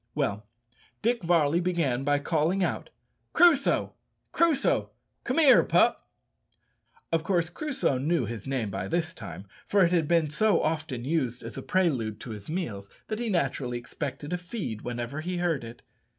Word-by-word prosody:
Well; 105 +1 -1 0.6
Dick 235 +1 +2
Varley 165 -2 +3
began 165 -8 0
by 145 +1 +2
calling 165 +5 +1
out, - - -2 0.4
"Crusoe! 325 -6 +4 0.4
Crusoe! 320 -5 +2 0.3
come - - -2
here, 300 -5 +7
pup." - - +2 1.0
Of 165 -1 +1
course 170 -2 0
Crusoe 260 - -1
knew 150 -1 +1
his 115 -1 -6
name 125 -7 -2
by 95 - -3
this 165 -1 -1
time, 100 - -9 0.2
for 200 -3 +4
it 170 - 0
had 165 -4 +2
been 165 -2 +3
so 215 +7 +2
often 155 -6 -2
used 130 -5 -1
as - - -7
a - - -5
prelude 130 - 0
to 120 - -7
his 105 +2 -8
meals 110 - -4 0.2
that 215 0 -2
he 240 -1 -2
naturally 135 -8 -1
expected 140 +5 -5
a 180 - -1
feed 175 - -5
whenever 120 +4 -4
he 180 +2 -3
heard 170 -7 0
it. 115 +1 -10
160 Hz, 165 wpm, -27 LUFS, 125-180 Hz, 1.0 s, here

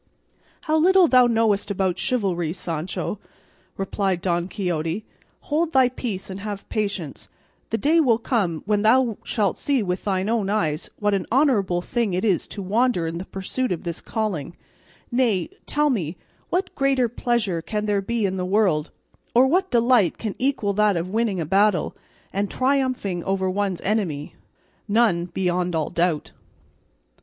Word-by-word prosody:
"How 310 0 +1
little 365 +2 +5
thou 255 -3 +6
knowest 220 -3 +1
about 190 -2 0
chivalry, 180 -9 0
Sancho," 175 +3 -4 0.6
replied 195 -1 -1
Don 175 -1 0
Quixote; 175 0 -2 0.4
"hold 320 +2 -1
thy 260 -2 +5
peace 230 -6 -5
and 190 - -6
have 205 -1 -6
patience; 200 -9 -3 0.4
the 225 - 0
day 310 +7 +3
will 245 -8 +4
come 200 - -1
when 205 0 +1
thou 230 0 +3
shalt 205 -3 0
see 275 -5 +1
with 180 -1 -2
thine 190 -1 0
own 220 -3 0
eyes 165 -7 -1
what 205 -1 +1
an 195 -2 -1
honourable 220 -10 +2
thing 225 -5 -1
it 185 - 0
is 190 -6 +1
to 200 - -6
wander 215 -1 +1
in 165 +1 -3
the 185 - -6
pursuit 195 +7 -3
of 175 - -2
this 170 -1 -5
calling; 190 - -3 0.6
nay, 235 -8 +1 0.2
tell 295 0 +2
me, 175 - -2 0.3
what 370 +2 -1
greater 270 -3 +2
pleasure 230 -7 -1
can 210 +4 -3
there 205 -1 +1
be 230 +2 -1
in 190 -1 -1
the 180 - -2
world, 180 -5 +2 0.5
or 250 +2 +7
what 370 +7 +2
delight 235 - +3
can 215 -3 -3
equal 250 -6 0
that 210 -2 +3
of 170 +2 -3
winning 220 -3 0
a 165 - -1
battle, 195 +3 +2 0.4
and 200 +1 -1
triumphing 255 -9 0
over 190 -1 0
one's 190 -1 -1
enemy? 185 -9 -1 0.5
None, 205 -6 +3
beyond 180 -1 -1
all 160 -2 -1
doubt." 170 -3 0
205 Hz, 160 wpm, -23 LUFS, 180-240 Hz, 0.6 s, or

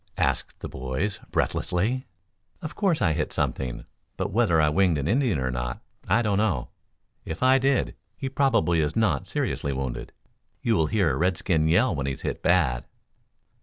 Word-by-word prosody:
asked - - -1
the - - -4
boys 65 +11 -3
breathlessly. 115 +9 0 0.5
"Of 155 - -6
course, 185 - +1
I 80 -4 +3
hit 75 -1 -2
something; 60 -2 -2 0.3
but 95 +2 -2
whether 100 -6 +3
I 75 - +4
winged 90 0 +3
an 70 0 -2
Indian 120 - +2
or 65 -1 -1
not, - - -3 0.3
I 120 - +3
don't 105 -2 +1
know. 90 - 0 0.5
If 80 +8 -5
I 130 +1 +6
did, 135 0 +1 0.2
he 135 - -3
probably 125 -11 +2
is 75 0 0
not 100 -12 +1
seriously 70 - -2
wounded. 65 -2 -4 0.5
You'll 100 -9 +2
hear 95 -4 +2
a - - -2
redskin 85 -2 +1
yell 95 +8 +3
when 70 -3 -2
he's 70 - -4
hit - - -3
bad." 75 -9 +2
90 Hz, 165 wpm, -26 LUFS, 70-115 Hz, 0.5 s, I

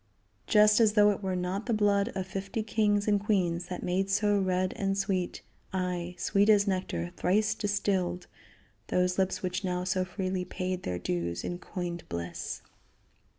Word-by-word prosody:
Just 210 0 +6
as 220 -2 +5
though 210 -1 +6
it 205 - -4
were 190 -2 -1
not 185 +4 -2
the 235 - +2
blood 205 -1 +3
of 190 - -2
fifty 195 +3 -4
kings 210 -1 +1
and 205 -1 +3
queens 180 -5 +1
that 180 - -5
made 190 +2 0
so 205 +1 +2
red 185 -1 0
and 195 0 -1
sweet, 185 -2 -1 0.3
aye, 180 -1 -2
sweet 200 +4 +2
as 205 -2 +6
nectar 135 - -2
thrice 215 +4 +2
distilled, 195 -4 -1 0.6
those 180 +1 +1
lips 190 0 0
which 180 +2 -2
now 180 -1 -1
so 185 0 0
freely 185 0 -2
paid 185 0 -3
their 90 - -3
dues 85 -1 -2
in 175 - -4
coined 175 -3 -5
bliss. 85 0 -5
190 Hz, 165 wpm, -29 LUFS, 180-205 Hz, 0.6 s, Just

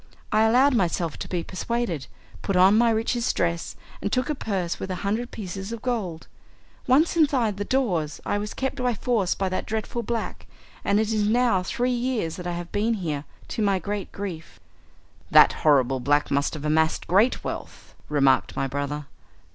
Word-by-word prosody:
I 215 0 +4
allowed 255 +5 +5
myself 170 -7 0
to - - -5
be 175 -2 -2
persuaded, 190 - -3 0.3
put 195 - -2
on 190 +3 +6
my 235 +1 +4
richest 230 +2 0
dress, 170 0 -1 0.3
and 200 - -2
took 255 +4 0
a - - +1
purse 190 - -3
with 190 - -5
a 185 - -2
hundred 225 +5 -1
pieces 195 0 -6
of 230 -1 -6
gold. 200 -10 -2 0.6
Once 295 +7 +4
inside 260 - +2
the 205 - -2
doors 185 - 0
I 205 - 0
was 210 +1 -5
kept 265 +1 -2
by 250 -2 0
force 215 -5 0
by 195 - -1
that 185 - -3
dreadful 220 +2 -2
black, 230 0 -4 0.4
and 200 +1 +2
it 220 0 0
is 210 -1 +1
now 235 -4 +3
three 245 +7 -1
years 240 -9 -1
that 180 -1 -6
I 175 - -2
have 175 0 -6
been 220 +3 +1
here, 155 -7 -3 0.2
to - - -3
my 200 -2 +3
great 200 +2 -4
grief." 185 -6 -7 0.7
"That - - +7
horrible 135 -4 +3
black 145 +3 +1
must 140 +2 +1
have 155 -1 -6
amassed 160 +1 +1
great 205 +8 +3
wealth," - - -7 0.2
remarked 135 -3 +3
my 135 - 0
brother. 145 +2 -3
200 Hz, 185 wpm, -25 LUFS, 170-235 Hz, 0.7 s, That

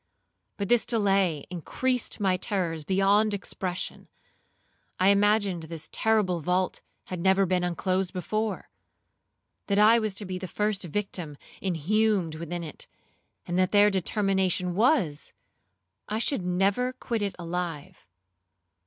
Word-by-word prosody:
But 200 - -2
this 240 +1 +4
delay 195 - +2
increased 250 +10 -1
my 190 -3 +2
terrors 180 -5 -2
beyond 200 +4 +3
expression; 185 -2 -4 0.9
I 185 +1 +5
imagined 200 -3 +3
this 160 -2 -6
terrible 210 -6 +1
vault 180 +3 0 0.2
had 185 - -6
never 190 +2 +3
been 180 0 +1
unclosed 185 +1 -1
before; 215 +3 -3 1.0
that 200 - +1
I 220 +3 +6
was 215 -3 -2
to 205 - -5
be 185 -1 -4
the 185 - -5
first 210 +2 -1
victim 175 -4 -3 0.2
inhumed 190 0 +1
within 170 +2 -5
it; 155 - -8 0.6
and 175 +1 -1
that 185 -1 +3
their 205 0 +5
determination 190 -2 +1
was, 205 - +1 0.8
I 215 - -1
should 235 0 +1
never 195 +8 +1
quit 235 -3 -3
it 200 -1 -2
alive. 170 - -5
190 Hz, 125 wpm, -27 LUFS, 180-210 Hz, 1.0 s, I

